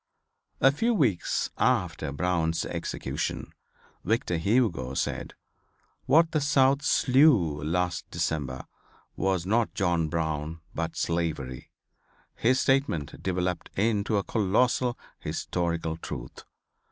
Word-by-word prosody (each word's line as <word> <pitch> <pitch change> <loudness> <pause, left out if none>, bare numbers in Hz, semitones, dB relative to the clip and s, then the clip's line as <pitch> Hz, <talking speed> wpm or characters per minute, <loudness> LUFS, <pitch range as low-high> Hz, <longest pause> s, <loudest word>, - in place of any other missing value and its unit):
A 135 - +6
few 230 +11 +1
weeks 115 - +1
after - - +1
Brown's 80 +1 0
execution 65 +2 -4 0.5
Victor 110 -3 0
Hugo 85 - +1
said, - - -3 0.7
"What 160 +4 +5
the 155 - +1
South 140 -1 +3
slew 125 - +4
last 90 +1 -1
December 65 -5 -2 0.5
was 95 -3 0
not 110 +4 +1
John 85 -4 +1
Brown 80 0 -2
but 85 0 -3
slavery." 80 -7 -2 0.6
His 130 +3 +2
statement 130 - 0
developed 90 -1 -2
into 105 0 +1
a 100 - 0
colossal 120 +5 +1 0.2
historical 85 -2 -2
truth. - - -8
90 Hz, 105 wpm, -27 LUFS, 80-125 Hz, 0.7 s, A